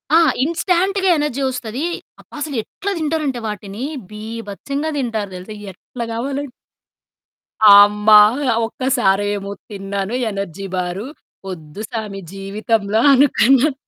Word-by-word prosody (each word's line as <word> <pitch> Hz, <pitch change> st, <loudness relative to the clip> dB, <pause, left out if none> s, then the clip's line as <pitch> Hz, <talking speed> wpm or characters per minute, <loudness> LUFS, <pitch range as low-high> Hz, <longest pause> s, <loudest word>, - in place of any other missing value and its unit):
ఆ! -, -, +8 dB, 0.2 s
ఇన్స్‌టాంట్‌గా 365 Hz, +4 st, +1 dB
ఎనర్జీ 295 Hz, -3 st, -1 dB
ఒస్తది. 250 Hz, +2 st, -5 dB, 0.4 s
అబ్బా! -, -, -16 dB
అసలెట్లా 295 Hz, -, -4 dB
తింటారంటే 300 Hz, -5 st, -1 dB
వాటిని, 210 Hz, +2 st, -6 dB, 0.3 s
బీభత్సంగా 225 Hz, +7 st, -5 dB
తింటారు 225 Hz, -6 st, -2 dB
తెలుసా? 185 Hz, +4 st, -8 dB, 0.2 s
ఎట్లా 235 Hz, +6 st, -8 dB
కావాలం 275 Hz, +5 st, -3 dB, 1.3 s
అమ్మా! 210 Hz, +1 st, +7 dB, 0.5 s
ఒక్కసారేమో 205 Hz, -5 st, 0 dB, 0.2 s
తిన్నాను 200 Hz, 0 st, -4 dB, 0.2 s
ఎనర్జీ 195 Hz, -1 st, -5 dB
బారు, 180 Hz, +3 st, -3 dB, 0.4 s
వద్దు 160 Hz, +1 st, -8 dB
సామి 210 Hz, -4 st, -5 dB
జీవితంలో 205 Hz, +2 st, -1 dB
అనుకున్నాను. 270 Hz, +1 st, +4 dB
220 Hz, 95 wpm, -19 LUFS, 200-275 Hz, 1.3 s, ఆ